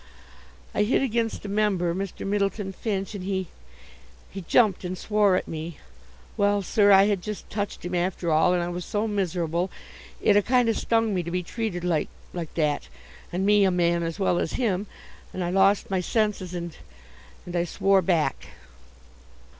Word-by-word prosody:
I -, -, +1 dB
hit 220 Hz, +5 st, +2 dB
against 230 Hz, -4 st, -1 dB
a -, -, -3 dB
member, 200 Hz, -4 st, +1 dB
Mr. 195 Hz, +1 st, -5 dB
Myddleton 200 Hz, 0 st, -1 dB
Finch, 195 Hz, -1 st, -3 dB
and 200 Hz, -3 st, -6 dB
he 190 Hz, -2 st, -2 dB, 0.8 s
he 195 Hz, -, -6 dB
jumped 200 Hz, +2 st, +3 dB
and 180 Hz, +1 st, -4 dB
swore 210 Hz, -1 st, +2 dB
at -, -, -1 dB
me. 160 Hz, 0 st, -6 dB, 0.6 s
Well, 205 Hz, 0 st, +2 dB
sir, 205 Hz, +2 st, +4 dB
I 195 Hz, 0 st, +8 dB
had 200 Hz, -2 st, +1 dB
just 210 Hz, +2 st, -7 dB
touched 205 Hz, -3 st, -4 dB
him 175 Hz, -, -4 dB
after 175 Hz, -1 st, -1 dB
all, 155 Hz, +3 st, +4 dB
and 175 Hz, -, 0 dB
I 175 Hz, -, -3 dB
was 175 Hz, 0 st, -4 dB
so 215 Hz, +3 st, -1 dB
miserable, 180 Hz, -3 st, -1 dB, 0.5 s
it 210 Hz, -, +4 dB
a 205 Hz, -, +6 dB
kind 245 Hz, +2 st, +2 dB
of 225 Hz, -, +1 dB
stung 225 Hz, -2 st, +1 dB
me 185 Hz, -, 0 dB
to 170 Hz, -, -6 dB
be 180 Hz, +1 st, -2 dB
treated 195 Hz, -2 st, -4 dB
like 170 Hz, -4 st, 0 dB, 0.2 s
like 170 Hz, -3 st, -5 dB
that, 150 Hz, -, 0 dB, 0.4 s
and 185 Hz, +2 st, -1 dB
me 205 Hz, 0 st, +5 dB
a 195 Hz, -, +4 dB
man 170 Hz, -1 st, +2 dB
as 165 Hz, -1 st, -3 dB
well 190 Hz, -3 st, +1 dB
as -, -, -2 dB
him, 205 Hz, -5 st, 0 dB, 0.5 s
and 185 Hz, -, -2 dB
I 175 Hz, -, -1 dB
lost 195 Hz, +1 st, +3 dB
my 190 Hz, -, +1 dB
senses, 195 Hz, -2 st, -1 dB
and 170 Hz, -1 st, -5 dB, 0.7 s
and 180 Hz, -, -6 dB
I 170 Hz, -, +2 dB
swore 195 Hz, +3 st, +2 dB
back." 165 Hz, -3 st, 0 dB
190 Hz, 185 wpm, -25 LUFS, 175-205 Hz, 0.8 s, I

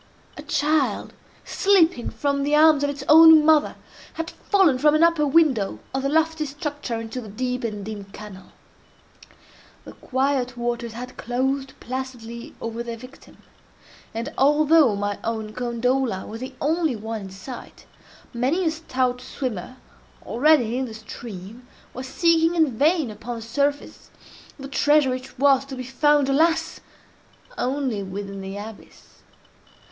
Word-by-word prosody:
A -, -, -8 dB
child, 300 Hz, -1 st, 0 dB, 0.3 s
slipping 360 Hz, -10 st, +2 dB
from 280 Hz, -1 st, -1 dB
the 290 Hz, +2 st, +1 dB
arms 305 Hz, -1 st, +5 dB
of 285 Hz, -, +1 dB
its 285 Hz, -1 st, -5 dB
own 320 Hz, 0 st, +8 dB
mother, 310 Hz, -1 st, +4 dB, 0.4 s
had 330 Hz, +1 st, -5 dB
fallen 370 Hz, -11 st, +2 dB
from 300 Hz, +2 st, +4 dB
an 310 Hz, -, +4 dB
upper 335 Hz, -3 st, +3 dB
window 270 Hz, -, +2 dB, 0.2 s
of 265 Hz, -, -1 dB
the 275 Hz, -, -1 dB
lofty 320 Hz, 0 st, +1 dB
structure 290 Hz, -4 st, -4 dB
into 225 Hz, +2 st, -6 dB
the 220 Hz, -, -10 dB
deep 250 Hz, +4 st, -3 dB
and 210 Hz, -3 st, -4 dB
dim 210 Hz, -2 st, -6 dB
canal. 195 Hz, -1 st, -12 dB, 1.3 s
The -, -, -9 dB
quiet 260 Hz, -2 st, -1 dB
waters 240 Hz, -1 st, -3 dB
had 250 Hz, +2 st, -8 dB
closed 265 Hz, +3 st, -2 dB
placidly 245 Hz, -2 st, -7 dB
over 230 Hz, +1 st, -5 dB
their 235 Hz, -1 st, -5 dB
victim; 255 Hz, +4 st, -15 dB, 0.7 s
and, 235 Hz, +6 st, -5 dB
although 295 Hz, -3 st, +4 dB
my 205 Hz, 0 st, -3 dB
own 220 Hz, -2 st, -3 dB
gondola 245 Hz, -3 st, -1 dB
was 225 Hz, -, -8 dB
the 260 Hz, +1 st, -7 dB
only 315 Hz, -2 st, 0 dB
one 220 Hz, 0 st, -5 dB
in 195 Hz, -, -8 dB
sight, 195 Hz, +7 st, -10 dB, 0.5 s
many 270 Hz, +10 st, 0 dB
a 320 Hz, -, +2 dB
stout 255 Hz, -6 st, -2 dB
swimmer, 255 Hz, -2 st, -5 dB, 0.5 s
already 250 Hz, -2 st, +3 dB
in 265 Hz, -, -1 dB
the 225 Hz, -3 st, -8 dB
stream, 220 Hz, +1 st, -10 dB, 0.3 s
was 260 Hz, +1 st, -6 dB
seeking 330 Hz, +3 st, +2 dB
in 315 Hz, -8 st, +2 dB
vain 305 Hz, -1 st, +2 dB
upon 220 Hz, +3 st, -7 dB
the 230 Hz, -, -7 dB
surface, 280 Hz, +5 st, -2 dB, 0.5 s
the 275 Hz, -1 st, -8 dB
treasure 290 Hz, 0 st, +3 dB
which 255 Hz, +1 st, -6 dB
was 275 Hz, 0 st, +4 dB
to 270 Hz, -1 st, -8 dB
be 255 Hz, -, -6 dB
found, 290 Hz, +2 st, +2 dB
alas! 320 Hz, +4 st, +1 dB, 0.8 s
only 260 Hz, -, -1 dB
within 195 Hz, +1 st, -6 dB
the 195 Hz, +1 st, -6 dB
abyss. 210 Hz, +1 st, -12 dB
260 Hz, 145 wpm, -23 LUFS, 230-295 Hz, 1.3 s, own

